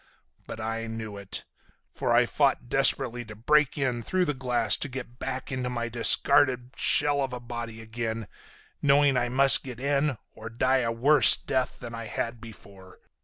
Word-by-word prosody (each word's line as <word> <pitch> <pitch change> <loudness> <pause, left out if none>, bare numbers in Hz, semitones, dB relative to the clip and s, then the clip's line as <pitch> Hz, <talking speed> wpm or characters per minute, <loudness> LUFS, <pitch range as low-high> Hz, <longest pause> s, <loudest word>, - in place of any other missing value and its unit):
But - - -8
I 115 +1 -4
knew 110 -2 -7
it. 100 -1 -7 0.5
For - - -2
I - - +4
fought 120 - 0
desperately 130 -3 +2
to 110 0 -11
break 150 +7 +1
in 130 -4 -1
through 185 +10 -1
the 150 - -1
glass 120 -6 +1
to 145 - -3
get 125 -1 -9
back 130 0 -5
into 130 -1 -3
my 120 -1 -4
discarded 125 +2 +3
shell 145 -1 +1
of 135 -2 -3
a 125 - -5
body 120 -2 -7
again, 110 -1 -5 0.5
knowing 140 -1 +3
I 120 -1 0
must 135 +2 +5
get 125 -3 -9
in 140 0 0
or 115 +1 -10
die 130 +3 +1
a 115 -2 -1
worse 140 +6 +5
death 130 -2 -3
than 120 -1 -9
I 115 0 -6
had 115 +1 -5
before. 100 -4 -14
120 Hz, 175 wpm, -26 LUFS, 115-135 Hz, 0.5 s, must